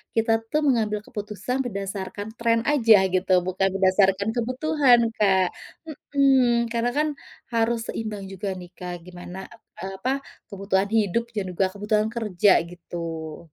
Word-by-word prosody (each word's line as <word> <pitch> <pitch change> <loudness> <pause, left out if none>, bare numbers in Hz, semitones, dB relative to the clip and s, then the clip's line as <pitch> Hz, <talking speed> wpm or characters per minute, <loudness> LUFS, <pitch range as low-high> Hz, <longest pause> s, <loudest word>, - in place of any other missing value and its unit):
kita 225 0 +2 0.2
tuh 305 - +3
mengambil 215 -5 +1
keputusan 210 +4 -4
berdasarkan 200 -1 -5
tren 230 -1 +2
aja, 230 -7 +6 0.2
gitu, 185 0 0 0.2
bukan 190 +1 +1
berdasarkan 195 +1 +3
kebutuhan, 255 +1 +3 0.2
Kak. 190 -3 +3 0.7
Mhm, 255 -4 +4
karena 235 +1 +1
kan 305 +1 +2 0.5
harus 230 +1 +1
seimbang 210 -3 -4
juga 195 +1 -4
nih, 180 - -10
Kak, 180 -1 -5
gimana, 180 +1 -9 0.4
eee, 190 - -4
apa, 250 +7 -1 0.4
kebutuhan 195 -1 0
hidup 220 +2 +1
dan 205 -3 -1
juga 190 +2 +1
kebutuhan 210 +1 0
kerja, 210 -4 +2 0.2
gitu. 165 -2 -7
210 Hz, 135 wpm, -24 LUFS, 190-235 Hz, 0.7 s, aja